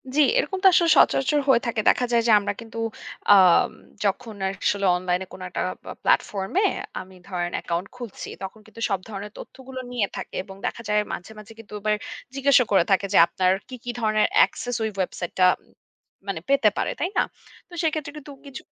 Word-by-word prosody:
জি। 305 Hz, -, +5 dB, 0.2 s
এরকম 400 Hz, -6 st, 0 dB
তো -, -, +8 dB
আসলে 340 Hz, -1 st, +4 dB
সচরাচর 290 Hz, +2 st, +4 dB
হয়ে 240 Hz, -3 st, +5 dB
থাকে। 230 Hz, -2 st, 0 dB
দেখা 250 Hz, -, +2 dB
যায় 235 Hz, -1 st, +4 dB
যে -, -, +5 dB
আমরা 205 Hz, 0 st, -2 dB
কিন্তু 230 Hz, 0 st, -10 dB, 0.5 s
আম 185 Hz, -4 st, +6 dB, 0.3 s
যখন 215 Hz, +3 st, -2 dB, 0.3 s
আসলে 200 Hz, -1 st, +1 dB
অনলাইনে 180 Hz, +1 st, -1 dB
কোনো 185 Hz, -, -9 dB
একটা -, -, -3 dB, 0.2 s
পা -, -, -8 dB
প্লাটফর্ম 195 Hz, -2 st, +1 dB
এ -, -, +4 dB, 0.3 s
আমি 185 Hz, 0 st, -11 dB
ধরেন 175 Hz, -2 st, -3 dB
অ্যাকাউন্ট 170 Hz, +3 st, -3 dB
খুলছি। 240 Hz, -5 st, -8 dB
তখন 195 Hz, +3 st, -7 dB
কিন্তু 220 Hz, +1 st, -13 dB
সব 195 Hz, -2 st, 0 dB
ধরনের 205 Hz, 0 st, -7 dB
তথ্যগুলো 265 Hz, 0 st, -9 dB
নিয়ে 235 Hz, -5 st, 0 dB
থাকে। -, -, -7 dB
এবং 190 Hz, 0 st, -11 dB
দেখা -, -, -3 dB
যায় 210 Hz, 0 st, +3 dB
মাঝে, 180 Hz, -, -7 dB
মাঝে 215 Hz, +1 st, -12 dB
কিন্তু 225 Hz, -2 st, -13 dB
এবার 215 Hz, +1 st, +1 dB, 0.4 s
জিজ্ঞাসা 275 Hz, -2 st, +5 dB
করে 195 Hz, -4 st, +5 dB
থাকে 195 Hz, +1 st, +3 dB
যে -, -, +5 dB
আপনার 185 Hz, +1 st, +1 dB, 0.2 s
কী, 255 Hz, -, -6 dB
কী 245 Hz, -, -3 dB
ধরনের 215 Hz, -1 st, +2 dB, 0.2 s
access 245 Hz, -1 st, -5 dB
ওই 220 Hz, -, 0 dB
ওয়েবসাইটেটা 185 Hz, -1 st, 0 dB, 0.8 s
মানে 185 Hz, -5 st, -3 dB
পেতে 275 Hz, -6 st, +5 dB
পারে, -, -, 0 dB
তাই 345 Hz, -, 0 dB
না? -, -, +5 dB, 0.5 s
তো -, -, -17 dB
সেক্ষেত্রে 310 Hz, -2 st, -1 dB
কিন্তু 295 Hz, -1 st, -10 dB
কিছু 275 Hz, -2 st, -8 dB
215 Hz, 190 wpm, -24 LUFS, 190-255 Hz, 0.8 s, তো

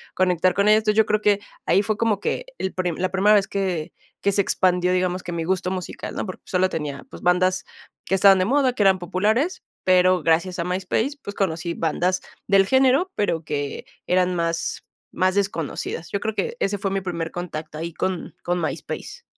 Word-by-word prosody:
conectar 185 Hz, -1 st, +2 dB
con 200 Hz, +1 st, +2 dB
ellos. 215 Hz, 0 st, +6 dB
Entonces, 215 Hz, -1 st, 0 dB
yo 220 Hz, -, +6 dB
creo 215 Hz, 0 st, +1 dB
que 205 Hz, -1 st, +3 dB, 0.3 s
ahí 200 Hz, -, +4 dB
fue 215 Hz, 0 st, 0 dB
como 220 Hz, -3 st, +1 dB
que -, -, -2 dB
el 190 Hz, -, -3 dB
prime 180 Hz, -3 st, -2 dB
la 185 Hz, -, 0 dB
primera 205 Hz, +2 st, +4 dB
vez 200 Hz, -2 st, +3 dB
que 180 Hz, -5 st, -2 dB, 0.3 s
que 200 Hz, -, +2 dB
se 200 Hz, -, +3 dB
expandió, 180 Hz, -1 st, +2 dB
digamos, 185 Hz, 0 st, 0 dB
que 175 Hz, -, -6 dB
mi 165 Hz, -1 st, -2 dB
gusto 180 Hz, +1 st, 0 dB
musical, 185 Hz, -1 st, -5 dB
¿no? -, -, -2 dB
Porque 185 Hz, -, -8 dB
solo 185 Hz, 0 st, +2 dB
tenía, 150 Hz, -5 st, -5 dB
pues, -, -, -10 dB
bandas 185 Hz, +1 st, +2 dB, 0.4 s
que 190 Hz, -, +1 dB
estaban 195 Hz, 0 st, +6 dB
de 185 Hz, -, +2 dB
moda, 265 Hz, +2 st, +2 dB
que 220 Hz, -, -3 dB
eran 190 Hz, -1 st, +5 dB
populares, 210 Hz, -, 0 dB, 0.2 s
pero 185 Hz, -2 st, +4 dB
gracias 170 Hz, +3 st, +2 dB
a -, -, +1 dB
MySpace, 190 Hz, -, -1 dB
pues, 200 Hz, -4 st, -7 dB
conocí 170 Hz, -3 st, -1 dB
bandas 180 Hz, +3 st, 0 dB, 0.3 s
del 195 Hz, -1 st, +5 dB
género, 265 Hz, -, +3 dB
pero 165 Hz, -6 st, 0 dB
que 145 Hz, -2 st, -4 dB, 0.2 s
eran 180 Hz, 0 st, +2 dB
más 170 Hz, -1 st, -1 dB, 0.3 s
más 185 Hz, +1 st, +1 dB
desconocidas. 170 Hz, -4 st, -2 dB
Yo 200 Hz, -, -1 dB
creo 220 Hz, +2 st, -2 dB
que 475 Hz, -, -2 dB
ese 205 Hz, +1 st, 0 dB
fue 195 Hz, 0 st, -2 dB
mi 195 Hz, 0 st, -1 dB
primer 170 Hz, -3 st, -3 dB
contacto 160 Hz, -3 st, -6 dB
ahí 165 Hz, +1 st, -5 dB
con 185 Hz, -1 st, -3 dB
con 175 Hz, 0 st, 0 dB
MySpace. 325 Hz, -, -5 dB
185 Hz, 200 wpm, -23 LUFS, 175-205 Hz, 0.4 s, ellos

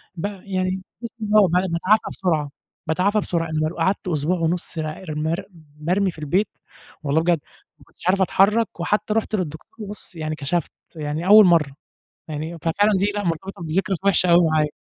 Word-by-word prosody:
ب 165 Hz, -, -4 dB, 0.2 s
يعني 185 Hz, -1 st, -2 dB, 0.4 s
ب 210 Hz, -1 st, -4 dB, 0.4 s
باتعافى 185 Hz, +6 st, +3 dB
بسرعة، 160 Hz, -6 st, -1 dB, 0.4 s
باتعافى 190 Hz, +6 st, +2 dB
بسرعة، 165 Hz, -4 st, -2 dB, 0.3 s
قعدت 190 Hz, +3 st, 0 dB
أسبوع 165 Hz, +2 st, 0 dB
ونُص 170 Hz, +1 st, -2 dB
را 155 Hz, +3 st, -4 dB
مر 165 Hz, +5 st, -2 dB, 0.3 s
مرمي 185 Hz, +5 st, +1 dB
في 165 Hz, -, -14 dB
البيت 175 Hz, +8 st, +1 dB, 0.6 s
والله 150 Hz, +3 st, +2 dB
بجد 170 Hz, -1 st, +2 dB, 0.4 s
ما -, -, -18 dB
كنتش -, -, -11 dB
عارف 190 Hz, +1 st, +3 dB
أتحرك، 210 Hz, +2 st, +2 dB
وحتى 210 Hz, +4 st, 0 dB
رُحت 220 Hz, -1 st, 0 dB
للدكتور 185 Hz, +4 st, -6 dB
بُص 205 Hz, -3 st, -9 dB
يعني 155 Hz, -1 st, -3 dB
كشفت 155 Hz, +3 st, -2 dB, 0.2 s
يعني 155 Hz, +3 st, -3 dB
أول 210 Hz, 0 st, +9 dB
مرّة 165 Hz, -5 st, +4 dB, 0.6 s
يعني، 155 Hz, +2 st, -5 dB
ففعلًا 205 Hz, +6 st, +2 dB
دي 205 Hz, +2 st, +1 dB
لأ 205 Hz, -1 st, -2 dB
مرتبطة 170 Hz, +2 st, -3 dB
بذكرى 165 Hz, +4 st, 0 dB
كانت 190 Hz, -1 st, -3 dB
وحشة 185 Hz, -2 st, +4 dB
أوي 170 Hz, 0 st, +6 dB
معايا. 155 Hz, -1 st, +2 dB
175 Hz, 160 wpm, -22 LUFS, 160-195 Hz, 0.6 s, أول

